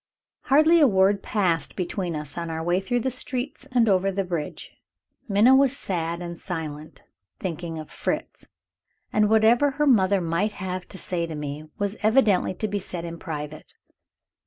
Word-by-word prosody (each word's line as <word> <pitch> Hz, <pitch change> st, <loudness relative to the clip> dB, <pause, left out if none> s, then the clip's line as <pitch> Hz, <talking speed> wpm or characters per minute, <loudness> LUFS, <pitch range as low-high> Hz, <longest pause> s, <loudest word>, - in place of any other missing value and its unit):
Hardly 310 Hz, +4 st, +5 dB
a 295 Hz, -, +7 dB
word 195 Hz, -1 st, +3 dB
passed 180 Hz, -6 st, 0 dB
between 180 Hz, -2 st, -3 dB
us 150 Hz, -1 st, -6 dB
on 170 Hz, -1 st, -4 dB
our 160 Hz, 0 st, -3 dB
way 175 Hz, +2 st, +2 dB
through 245 Hz, +5 st, -1 dB
the 260 Hz, -, -1 dB
streets 260 Hz, +1 st, -5 dB
and 240 Hz, -3 st, +3 dB
over 195 Hz, -1 st, +3 dB
the 195 Hz, +1 st, -1 dB
bridge. 170 Hz, -5 st, -5 dB, 0.6 s
Minna 210 Hz, +6 st, +5 dB
was 275 Hz, 0 st, +3 dB
sad 170 Hz, -1 st, -3 dB
and 170 Hz, -1 st, -7 dB
silent, 155 Hz, -4 st, -6 dB, 0.4 s
thinking 170 Hz, -2 st, -4 dB
of 155 Hz, -, -8 dB
Fritz; -, -, -4 dB, 0.7 s
and 210 Hz, -1 st, +3 dB
whatever 225 Hz, +6 st, +5 dB
her 295 Hz, -, +2 dB
mother 200 Hz, -7 st, +4 dB
might 175 Hz, +5 st, -1 dB
have 185 Hz, -1 st, -5 dB
to -, -, -9 dB
say 170 Hz, -2 st, -2 dB
to 160 Hz, -, -6 dB
me, 150 Hz, +1 st, -5 dB
was 205 Hz, +1 st, -2 dB
evidently 215 Hz, -4 st, +3 dB
to 215 Hz, -, -2 dB
be 205 Hz, 0 st, -2 dB
said 175 Hz, -2 st, -6 dB
in 170 Hz, 0 st, -7 dB
private. 150 Hz, -2 st, -7 dB
190 Hz, 170 wpm, -25 LUFS, 170-220 Hz, 0.7 s, a